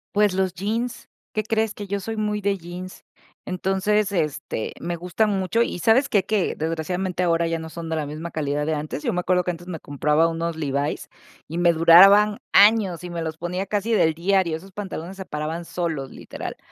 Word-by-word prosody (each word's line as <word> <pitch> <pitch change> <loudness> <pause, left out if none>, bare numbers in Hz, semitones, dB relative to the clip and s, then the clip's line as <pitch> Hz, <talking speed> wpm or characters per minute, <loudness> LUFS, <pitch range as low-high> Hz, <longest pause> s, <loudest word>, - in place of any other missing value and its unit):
Pues 205 -2 +4
los 190 -1 0
jeans. 220 +6 -3 0.2
¿Qué 215 - 0
crees? 220 0 0
Que 205 -2 -8
yo 200 +1 -2
soy 225 +3 -5
muy 210 -1 -1
de 200 0 0
jeans. 180 +1 -9 0.4
Entonces, 195 +3 0
este, 150 - -2
me 175 0 -3
gustan 180 +6 0
mucho. 195 +3 0
¿Y 235 - -1
sabes 230 - +3
qué? 200 -4 +2
Que 210 -3 0
desgraciadamente 175 +3 -2
ahora 170 -1 +2
ya 165 0 -1
no 160 0 -7
son 165 0 -7
de 160 - -1
la 155 -2 -2
misma 155 +4 -6
calidad 150 -1 -1
de 160 - 0
antes. 150 -1 -4
Yo - - 0
me 180 - 0
acuerdo 180 0 +2
que 180 - -1
antes 175 +1 -10
me 170 -3 -5
compraba 150 +3 +1
unos 165 0 -2
Levi's 140 -1 -2 0.4
y 165 - -5
me 175 0 +4
duraban 195 +6 +7
años 200 -4 +5
y 180 - -6
me 170 -1 -4
los 160 -1 -4
ponía 180 +3 -3
casi 210 +3 -1
del 160 -7 +3
diario. 175 -1 +1
Esos 190 +4 -14
pantalones 190 -2 -6
se 190 - -7
paraban 155 +2 -4
solos, 165 -5 -3
literal. - - -7
180 Hz, 205 wpm, -23 LUFS, 165-200 Hz, 0.4 s, duraban